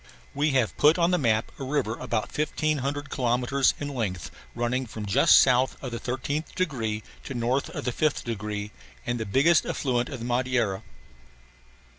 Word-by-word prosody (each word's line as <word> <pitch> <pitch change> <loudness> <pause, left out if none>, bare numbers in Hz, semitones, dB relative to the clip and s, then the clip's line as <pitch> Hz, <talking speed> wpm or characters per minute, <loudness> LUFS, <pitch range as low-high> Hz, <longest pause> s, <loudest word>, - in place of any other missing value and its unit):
We 145 +2 +1
have 125 -5 +1
put 150 +3 +5
on 170 0 +3
the 180 - +2
map 110 -4 +1
a - - -4
river 130 -5 -1
about 110 -2 -3
1500 145 -2 -1
kilometres 125 +2 +1
in 145 - -3
length 105 - -3 0.2
running 120 +2 -1
from 110 -1 -6
just 100 - +6
south 130 0 +3
of 130 - -6
the 115 - -4
13th 140 +5 -3
degree 115 - -2 0.2
to 135 - -6
north 125 +3 0
of - - -6
the 125 - 0
5th 155 +2 0
degree 105 -2 -4 0.3
and 120 0 -1
the 110 - -3
biggest 150 +11 +4
affluent 125 -3 -1
of 135 - -5
the 115 - -6
Madeira. 120 -5 0
125 Hz, 170 wpm, -26 LUFS, 115-145 Hz, 0.3 s, just